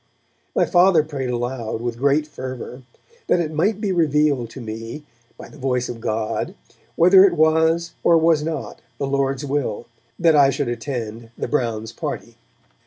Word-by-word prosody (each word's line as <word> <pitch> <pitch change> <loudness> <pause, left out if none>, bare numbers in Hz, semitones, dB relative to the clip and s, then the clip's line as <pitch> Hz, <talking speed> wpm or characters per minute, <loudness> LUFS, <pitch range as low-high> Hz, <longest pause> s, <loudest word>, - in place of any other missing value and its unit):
My - - +3
Father 175 -3 +4
prayed 140 -4 -4
aloud, 120 -2 -3
with 120 0 -4
great 140 +3 +2
fervour, 130 -3 -7 0.5
that - - +3
it 160 -2 -2
might 195 +7 +1
be 210 -3 -1
revealed 150 -7 +2
to 130 - -10
me, 115 +5 -7 0.3
by - - -10
the 150 - -15
voice 125 -2 -1
of 115 -2 -7
God, 110 -1 -2 0.4
whether 185 +3 +7
it 195 -3 +4
was 160 +2 +2
or 170 - +5
was 160 -1 +3
not 160 +1 -5 0.2
the 140 - -2
Lord's 135 0 -1
will 135 -6 -2 0.3
that 165 -2 +4
I 140 -2 +6
should 140 -1 -1
attend 120 -3 -5
the - - -3
Browns' 115 -5 -2
party. - - -5
140 Hz, 165 wpm, -21 LUFS, 120-160 Hz, 0.5 s, whether